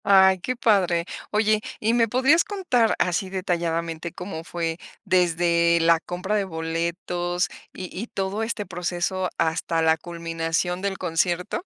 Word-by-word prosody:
¡Ay, 190 -1 +6
qué 255 +8 -2
padre! 185 -8 +2 0.2
Oye, 215 0 +2 0.2
¿y 225 +2 +1
me 235 -1 +3
podrías 265 +8 +4
contar 355 - +1
así 180 +1 0
detalladamente 170 -3 -2
cómo 180 -2 -6
fue 165 -1 -3 0.3
desde 170 -1 +3
la 165 0 +4
compra 180 +5 -3
de 205 - +2
boletos 175 +2 -2 0.2
y - - -10 0.2
y 230 - -5
todo 195 +1 -3
este 225 -2 -2
proceso 180 +1 -2
hasta 165 0 0
la 160 0 +4
culminación 165 +1 -2
del 195 -1 -2
concierto? 175 - -1
180 Hz, 140 wpm, -24 LUFS, 170-200 Hz, 0.3 s, Ay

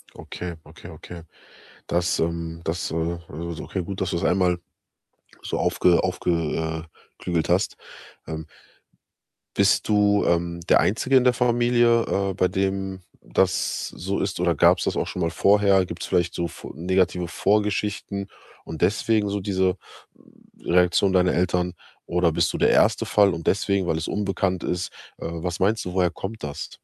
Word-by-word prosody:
Okay, 90 -1 -7
okay, - - -13
okay. 85 -1 -10 0.7
Das 85 0 0
ähm, 85 0 -2
das, 85 +2 -2
äh 85 +1 -2
also, 85 +2 -6
okay, 95 - -3
gut, 95 +2 -6
dass 95 - -1
du - - -1
es 85 - -2
einmal 90 -1 +2 0.8
so - - -3
aufge 90 -1 +3
aufge 90 -1 -2
äh, 80 -1 -2 0.4
klügelt 85 -2 -1
hast. 95 +5 +1 0.5
Ähm 80 -1 -5 1.1
bist 100 -1 +3
du, 105 -1 +3
ähm, 85 0 0
der - - +6
Einzige 130 +6 +2
in 125 - +4
der 125 -1 +4
Familie, 120 -1 +3
äh, 100 -2 -1
bei 90 0 +2
dem 95 0 -2 0.2
das - - 0
so 95 +3 -3
ist 95 -2 -2
oder 85 -2 +2
gab's - - +4
das - - -1
auch - - -1
schon - - -5
mal 85 -1 0
vorher? 100 0 +4
Gibt's 85 -1 -6
vielleicht 85 -2 0
so 85 - -1
V - - -10
negative 90 +1 0
Vorgeschichten 100 0 -1 0.4
und 80 - -8
deswegen 105 +2 +2
so 100 0 -1
diese 95 -1 0 0.8
Reaktion 90 +2 +3
deiner 90 -1 +3
Eltern? 90 0 0 0.3
Oder 85 -1 +1
bist - - +1
du - - -2
der - - +3
1. - - +3
Fall 100 -3 +4
und 80 - -6
deswegen, 100 -1 +1
weil 80 - +1
es 80 - -3
unbekannt 95 -2 -1
ist? 90 0 -2 0.3
Äh, - - -8
was 85 +1 -4
meinst 105 +4 +1
du, 90 - -5
woher 90 -2 +2
kommt 100 +3 -7
das? 70 -1 -5
90 Hz, 165 wpm, -24 LUFS, 85-100 Hz, 1.1 s, der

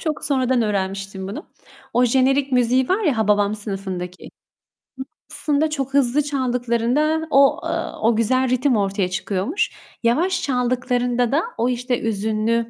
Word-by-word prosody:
çok 310 -2 -3
sonradan 260 -3 +1
öğrenmiştim 195 -1 -3
bunu. 290 - -7 0.5
O 250 - +3
jenerik 265 +2 +2
müziği 250 +1 +2
var 405 +3 +1
ya 285 -9 +1
Hababam 210 -1 +2
Sınıfı'ndaki. 190 -4 -6 1.0
Aslında 305 +1 +1
çok 275 -3 -3
hızlı 280 +1 +3
çaldıklarında 260 +3 0
o, 275 0 +4
ııı, - - -3
o 225 +1 +3
güzel 255 +3 +1
ritim 255 +1 +2
ortaya 195 -2 0
çıkıyormuş. 195 - -2 0.3
Yavaş 335 +11 +1
çaldıklarında 250 -1 0
da 315 +4 +2
o, 240 +2 +1
işte, 245 0 -1
hüzünlü, 220 +2 0
245 Hz, 130 wpm, -21 LUFS, 215-270 Hz, 1.0 s, o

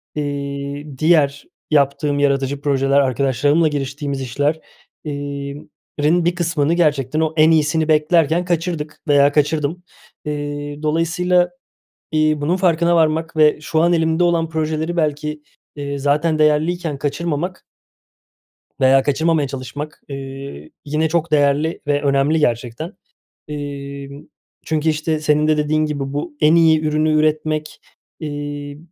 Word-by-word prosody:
iii, 140 -1 -4
diğer 150 -3 +2 0.3
yaptığım 145 0 +2
yaratıcı 140 0 0
projeler, 140 -1 +2
arkadaşlarımla 140 +4 +2
giriştiğimiz 140 -1 -3
işler, 145 +5 -1 0.4
iii, 140 -1 -6 0.3
rin 165 +3 +2
bir 175 0 +1
kısmını 165 -3 0
gerçekten 150 -4 +1
o 160 0 0
en 155 +1 +6
iyisini 160 0 +2
beklerken 160 +2 +2
kaçırdık 165 -3 -3
veya 145 0 +5
kaçırdım. 150 +3 0 0.4
İii, 145 0 -5
dolayısıyla, 175 +3 +1 0.6
iii, 155 -1 +2
bunun 165 +5 +1
farkına 170 -2 +2
varmak 160 0 +1
ve 150 -1 +4
şu 160 +1 -1
an 175 - +3
elimde 165 +1 +2
olan 165 -2 +1
projeleri 160 +1 -2
belki, 150 -1 -1 0.3
iii, 140 -1 -4
zaten 150 +3 +1
değerliyken 155 0 +1
kaçırmamak 165 +5 -3 1.2
veya 135 +1 +5
kaçırmamaya 155 +1 +1
çalışmak, 135 +3 -7
iii, 135 - -8
yine 155 +2 0
çok 170 -1 -1
değerli 145 +2 +2
ve 145 0 +1
önemli 140 +2 +2
gerçekten. 125 - -2 0.6
İii, 140 -1 -7 0.4
çünkü 160 0 0
işte 155 0 0
senin 150 0 +2
de 155 - +3
dediğin 155 +1 +1
gibi 140 -2 -4
bu 145 +1 -4
en 155 +1 +5
iyi 160 -2 +5
ürünü 155 0 +1
üretmek, 155 0 0 0.4
iii, 145 -1 -5
150 Hz, 125 wpm, -19 LUFS, 140-160 Hz, 1.2 s, en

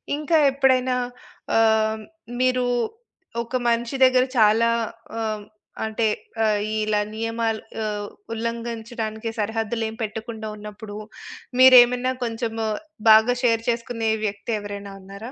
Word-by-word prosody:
ఇంకా 305 +2 +1
ఎప్పుడైనా 260 -2 +2 0.6
ఆహ్, 220 -1 +3 0.4
మీరు 255 0 +2 0.8
ఒక 235 +2 -6
మనిషి 235 +2 0
దగ్గర 255 -1 +4
చాలా 225 +1 +5 0.5
ఆహ్, 215 -2 -2 0.4
అంటే 220 +1 0 0.4
ఆహ్, 215 -1 +2 0.2
ఇలా 215 -1 +1 0.2
నియమాలు 225 0 -1 0.2
ఆహ్, 210 -1 -3 0.3
ఉల్లంఘించడానికి 230 -1 -4
సరిహద్దులేం 220 +1 -2
పెట్టకుండా 220 0 -5
ఉన్నప్పుడు. 210 0 -9 0.6
మీరేమైనా 255 0 +7
కొంచెము 225 -1 -2 0.4
బాగా 220 +3 +7
షేర్ 230 -2 +2
చేసుకునే 230 -1 -1
వ్యక్తి 205 +3 -3
ఎవరైనా 200 -1 -7
ఉన్నారా? 200 +5 -9
225 Hz, 100 wpm, -23 LUFS, 215-240 Hz, 0.8 s, మీరేమైనా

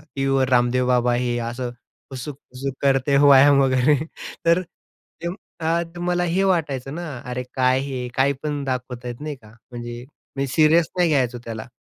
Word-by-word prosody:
टीव्हीवर 135 -1 +1
रामदेव 125 0 +2
बाबा, 125 -1 +3
हे 120 0 0
असं 120 +1 -4 0.4
हुसुक-हुसुक 130 0 -6
करते, 140 0 +3
व्यायाम 140 0 +7
वगैरे. 130 +2 +3 0.5
तर 170 +2 +4 0.6
तेव्हा 170 -2 -2 0.2
मला 175 0 +1
हे 175 +3 +1
वाटायचं 145 -8 0
ना, 175 -1 -5 0.2
अरे 125 0 -4
काय 130 0 +2
हे, 130 -3 -4
काय 140 +2 +3
पण 145 -2 -2
दाखवत 125 -2 -4
आहेत, 120 +2 -6
नाही 150 -1 -4
का? 110 -5 -18 0.2
म्हणजे 120 0 -7 0.3
मी 135 0 0
सीरियस 155 +4 +4
नाही 175 -2 +3
घ्यायचो 125 -5 +1
त्याला. 110 0 -6
135 Hz, 150 wpm, -22 LUFS, 125-150 Hz, 0.6 s, व्यायाम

